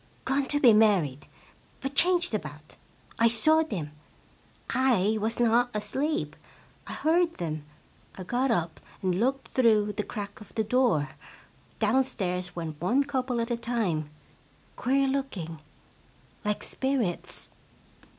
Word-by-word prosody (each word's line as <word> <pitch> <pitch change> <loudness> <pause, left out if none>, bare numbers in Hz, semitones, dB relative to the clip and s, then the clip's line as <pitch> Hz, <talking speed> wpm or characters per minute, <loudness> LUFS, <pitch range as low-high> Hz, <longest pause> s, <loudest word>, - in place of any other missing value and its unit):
Gone 270 +1 +1
to 290 - 0
be 245 -6 +7
married, 185 -11 +3 0.5
but 270 +1 -4
changed 350 0 +3
about! 150 -6 -6 0.4
I 230 - +6
saw 310 +8 +4
them. 180 - -4 0.8
I 220 -5 +2
was 225 +2 -1
not 240 +1 +3
asleep! 270 +10 -2 0.5
I - - -6
heard 335 +2 +2
them; 155 -3 -4 0.5
I 185 - -7
got 245 +8 0
up 170 -8 -1 0.2
and 185 -1 +1
looked 265 +4 0
through 215 -4 +3
the 210 +1 -2
crack 205 -2 -7
of 210 - -14
the 220 - +1
door. 220 - +2 0.7
Downstairs 200 -7 0
went 160 -3 -5
one 245 +11 +3
couple 260 -3 -2
at 230 +1 -3
a - - +2
time. 215 -11 -1 0.7
Queer 270 +2 +2
looking 210 - -3 0.8
like 210 0 -1
spirits! 260 -10 -2
225 Hz, 130 wpm, -28 LUFS, 180-265 Hz, 0.8 s, be